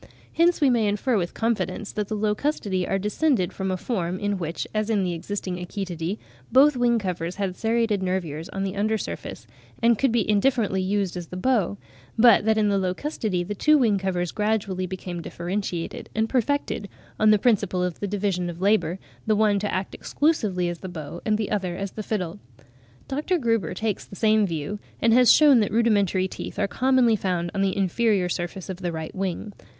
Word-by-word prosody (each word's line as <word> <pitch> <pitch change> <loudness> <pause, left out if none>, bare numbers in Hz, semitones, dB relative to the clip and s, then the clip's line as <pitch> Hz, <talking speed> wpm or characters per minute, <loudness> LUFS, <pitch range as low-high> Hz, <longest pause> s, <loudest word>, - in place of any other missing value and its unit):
Hence 340 +1 +3
we 275 -3 +5
may 230 -3 +2
infer 210 +5 0
with 175 -4 -1
confidence 225 -2 -1
that 210 -1 -3
the 215 - -3
Locustidae 210 -3 -1
are 195 - +1
descended 210 - 0
from 190 -1 -3
a 185 - -1
form, 180 -4 -2
in 205 0 -2
which, 165 -1 -4
as 215 0 -1
in 210 -3 +2
the 180 -1 -1
existing 185 +1 -4
Achetidae, 180 0 -4 0.3
both 280 +2 +6
wing 240 -1 +3
covers 180 -4 -3
had 195 -2 -2
serrated 225 -2 +1
nervures 180 -3 -3
on 195 0 -3
the 195 0 -3
under 215 +2 +1
surface, - - -6 0.3
and 230 -1 +3
could 270 -3 +3
be 230 -3 +1
indifferently 210 -2 +2
used 195 -1 -1
as 175 -2 -5
the 180 - -7
bow; 205 -3 +1 0.4
but 225 -2 +6
that 220 0 +3
in 215 -1 +3
the 200 -1 +2
Locustidae 185 - -2
the 205 - -2
two 305 +9 +4
wing 220 -7 +3
covers 180 -3 -1
gradually 210 -4 -1
became 180 -1 -6
differentiated 175 0 -4
and 220 0 +1
perfected, 250 -4 -1 0.3
on 215 - +5
the 215 - +6
principle 200 -5 +1
of 180 -2 -3
the 205 - -2
division 190 -3 -1
of 170 0 -7
labour, 185 -3 +2 0.3
the 215 - +3
one 210 -1 +3
to 205 +1 -2
act 185 +1 -3
exclusively 210 - 0
as 175 -1 -4
the 190 - -7
bow, 170 0 -7
and 215 -1 +3
the 215 -2 -3
other 190 -4 -1
as 195 -1 -4
the 215 - -6
fiddle. 200 -3 -3 0.7
Dr. 300 +7 0
Gruber 230 - 0
takes 215 +1 -2
the - - -12
same 215 0 +3
view, 165 +5 -4 0.2
and 230 0 +3
has 250 0 +7
shewn 290 -5 +7
that 210 - +1
rudimentary 205 -5 +2
teeth - - -7
are 200 - +1
commonly 255 -1 +3
found 180 -4 -2
on 195 - -1
the 195 -1 0
inferior 195 -1 +1
surface 175 +1 -4
of 190 -2 -5
the 180 -2 -3
right 160 -1 -5
wing. 195 +2 -3
200 Hz, 195 wpm, -24 LUFS, 185-220 Hz, 0.7 s, has